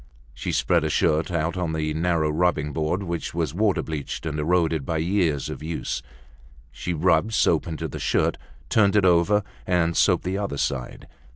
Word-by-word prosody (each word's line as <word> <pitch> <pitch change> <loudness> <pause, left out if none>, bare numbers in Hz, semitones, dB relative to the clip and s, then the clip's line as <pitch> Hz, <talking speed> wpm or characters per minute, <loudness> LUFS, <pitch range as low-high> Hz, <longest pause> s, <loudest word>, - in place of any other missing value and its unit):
She - - -4
spread - - +2
a - - 0
shirt 80 +1 +1
out 85 -1 -1
on 85 -3 -1
the 75 -1 -1
narrow 80 -1 +1
rubbing 80 -2 0
board 80 +5 -1
which 85 -2 -4
was 80 -4 -1
water 105 +1 +1
bleached 75 -1 -5
and 75 -1 -3
eroded 80 -1 +1
by 80 +4 -2
years 80 -4 0
of - - -6
use. 80 +1 -3 0.7
She 90 - -5
rubbed 85 +6 +2
soap 80 -4 +2
into 80 -2 -4
the - - -7
shirt, - - +1 0.3
turned 100 - +3
it 105 -2 +4
over, 90 +4 +4 0.2
and 85 -2 +1
soaped - - +3
the 95 +2 -2
other 100 -8 -3
side. 65 -2 -3
85 Hz, 180 wpm, -24 LUFS, 80-90 Hz, 0.7 s, it